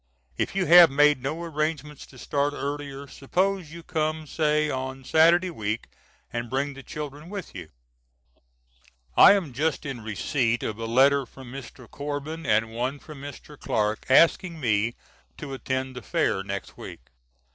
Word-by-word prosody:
If - - -2
you 195 -2 +1
have 175 -1 +9
made 145 0 +4
no 155 +6 -3
arrangements 155 -2 -3
to 130 - -16
start 145 +3 -1
earlier 140 -1 -5
suppose 180 +5 -1
you 170 0 -10
come 155 -1 -2
say 150 0 +1
on 130 -1 -4
Saturday 170 +6 +4
week 110 -6 -4 0.4
and 120 0 -3
bring 140 +3 -1
the 135 - -10
children 150 +2 -7
with 200 -3 -7
you. 90 -4 -8 1.5
I - - +9
am 180 -10 -1
just 155 +5 -1
in 135 -5 -5
receipt 115 - -1
of 110 0 -4
a 115 - -3
letter 135 +3 +4
from 130 -1 -12
Mr. 130 -2 -10
Corbin, 145 +4 -5
and 110 +1 +2
one 125 +4 -2
from 145 -1 -12
Mr. 145 +1 -10
Clark, 105 0 -1
asking 165 +4 +4
me 115 -2 +1 0.4
to 140 -2 -7
attend 130 0 -3
the 125 - -6
Fair 95 -2 0
next 100 0 -6
week. - - -9
140 Hz, 155 wpm, -26 LUFS, 125-155 Hz, 1.5 s, have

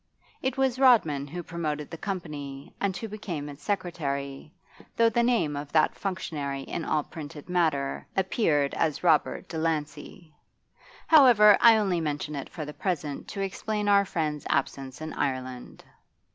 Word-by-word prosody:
It 260 +1 -1
was 265 -1 +1
Rodman 160 - +4
who 175 +4 -6
promoted 155 -3 -4
the - - -5
company 150 -8 -6
and 195 -2 0
who 225 - -5
became 190 -8 -5
its 145 0 -11
secretary, 145 -7 -3 0.5
though 230 0 +5
the 235 +2 +1
name 235 -12 +1
of 145 0 -6
that 155 -1 +4
functionary 150 -8 -4
in 165 - -4
all 155 -2 0
printed 150 -1 -9
matter 160 -6 0
appeared 165 -7 +1
as 160 -1 -1
'Robert 165 +2 +2
Delancey.' 160 0 -4 0.7
However, 240 -9 +7
I 230 -2 +8
only 190 -5 +1
mention 150 0 -3
it 140 -2 -5
for 155 - -6
the 150 - -7
present 150 -7 -3
to 200 - -5
explain 210 +2 -2
our 200 -1 +5
friend's 155 -5 -3
absence 135 0 -2
in 155 0 -5
Ireland. 130 -2 -4
160 Hz, 150 wpm, -27 LUFS, 145-200 Hz, 0.7 s, I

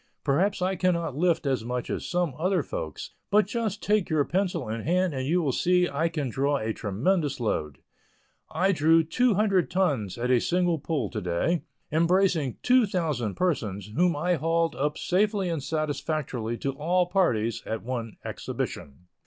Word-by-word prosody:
Perhaps 180 +7 +1
I 190 +1 +1
cannot 170 -5 0
lift 170 0 +1
as 130 -4 0
much 125 +1 -3
as - - -3
some 175 -5 0
other 185 +2 +1
folks, - - -6 0.2
but 210 0 +4
just 215 -1 -3
take 210 -2 +1
your 155 -3 +2
pencil 190 - -1
in 110 +1 -3
hand 180 +3 +1
and 130 -1 -3
you 175 +3 +2
will 140 - +1
see 180 +6 +2
I 160 +3 0
can 155 -4 -2
draw 140 +4 0
a 110 -3 -2
tremendous 140 - 0
load. 75 - -2 0.7
I 185 +5 +2
drew 165 -1 +4
two 235 +8 +2
hundred 195 -3 +2
tons 140 - 0
at 125 +2 -1
a 125 -2 +4
single 175 -2 +1
pull 140 -7 -2
to 110 - -3
day, 90 - 0 0.3
embracing 170 -4 +2
two 250 -3 +4
thousand 150 - -1
persons, 105 - -1
whom 175 +1 +3
I 175 +4 +1
hauled 165 +2 +1
up 150 +2 -1
safely 200 0 +1
and 165 -3 -2
satisfactorily 145 -6 -2
to 135 - -2
all 175 +6 +1
parties, 120 - +1
at 110 - -3
one 115 -2 -4
exhibition. 70 +5 -5
160 Hz, 170 wpm, -27 LUFS, 130-180 Hz, 0.7 s, but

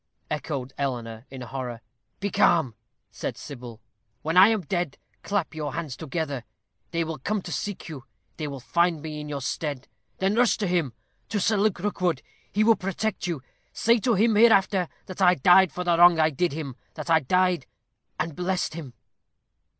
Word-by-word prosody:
echoed 140 -3 -3
Eleanor, 120 -3 -3
in 130 -1 -9
horror. 125 -1 -5 0.4
"Be 200 0 -2
calm," 160 -11 +3 0.4
said - - -5
Sybil. 120 -5 -9 0.4
"When 160 +2 -1
I 185 +2 +9
am 220 -2 +2
dead, 175 -2 -2 0.2
clap 200 -6 -1
your 150 -3 -4
hands 160 -6 -4
together. 145 -4 -3 0.5
They 165 -1 0
will 160 -3 -5
come 205 +8 -2
to 175 - -7
seek 200 +7 -4
you 145 -6 -8 0.3
they 155 - -3
will 140 -2 -6
find 170 +1 +1
me 155 -1 -5
in 150 - -7
your 140 -1 -4
stead. 140 -1 -3 0.3
Then 190 +1 +1
rush 235 -2 +3
to 210 - -1
him 175 -9 0 0.4
to 205 - 0
Sir 215 +3 +2
Luke 205 -1 +2
Rookwood. 180 -6 -1 0.3
He 210 - +2
will 225 +1 +6
protect 195 +1 -2
you. 160 -7 -3 0.3
Say 230 +1 +3
to 235 +1 +2
him 220 +4 +3
hereafter 200 -5 +4 0.2
that 185 +1 -8
I 180 -1 +6
died 180 +4 +6
for 180 - -4
the 175 -1 +3
wrong 175 -1 +7
I 155 0 +4
did 170 +5 0
him 140 -5 -5 0.2
that 165 - -4
I 160 - +6
died, 180 0 +1 0.5
and 165 -3 -2
blessed 180 -1 -1
him." 145 -7 -8
170 Hz, 180 wpm, -26 LUFS, 140-190 Hz, 0.5 s, I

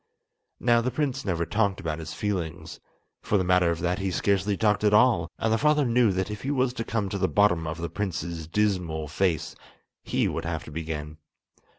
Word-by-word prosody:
Now 120 -1 +3
the 125 - 0
prince 140 -1 -2
never 85 -4 0
talked 100 -1 0
about 80 -4 -3
his 80 -1 -6
feelings—for 95 +1 -4
the 95 - +1
matter 90 -1 +3
of 85 -1 -2
that 90 +2 0
he 95 0 -1
scarcely 100 +2 +1
talked 105 -1 +2
at 105 0 +4
all; 105 -7 +4
and 110 0 +1
the 110 - +2
father 150 -1 +3
knew 120 -2 +3
that 95 +2 -2
if 105 - -6
he 135 - -3
was 130 -3 +1
to 115 -2 -3
come 115 -3 -2
to 100 - -3
the 95 - +2
bottom 90 -6 +2
of 80 +2 -4
the 85 0 -3
prince's 85 -3 -4
dismal 90 -5 0
face, 85 0 -1 0.5
he - - 0
would - - -3
have 80 -1 -3
to 75 - -11
begin. 75 -1 -5
95 Hz, 205 wpm, -26 LUFS, 85-110 Hz, 0.5 s, at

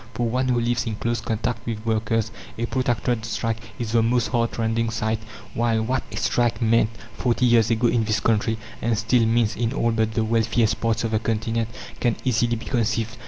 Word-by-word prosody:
For 120 +1 0
one 130 +3 0
who 125 -1 +2
lives 120 0 0
in 110 - -2
close 120 +2 -1
contact 115 +1 -2
with 110 -1 -4
workers, 115 0 0 0.3
a 115 - -1
protracted 120 -2 0
strike 115 0 -2 0.2
is 115 -2 -3
the 115 0 +4
most 120 +1 +2
heartrending 115 -1 0
sight; 110 -1 -1 0.3
while 115 -1 +1
what 125 +3 0
a - - -6
strike 120 -1 +1
meant 115 -2 +3 0.3
forty 125 0 +1
years 115 -2 +4
ago 115 +1 +1
in 115 -1 +2
this 110 +1 +1
country, 110 0 +1 0.2
and 115 -1 +1
still 115 +1 +2
means 115 -2 +2
in 115 +2 -1
all 115 -4 +1
but 110 -1 0
the 115 - +2
wealthiest 115 0 +1
parts 115 -1 +1
of 115 - -1
the 110 - +2
continent, 115 0 -1 0.3
can 120 -3 +1
easily 120 -2 +2
be 115 +1 -7
conceived. 115 -1 0
115 Hz, 200 wpm, -23 LUFS, 110-120 Hz, 0.3 s, the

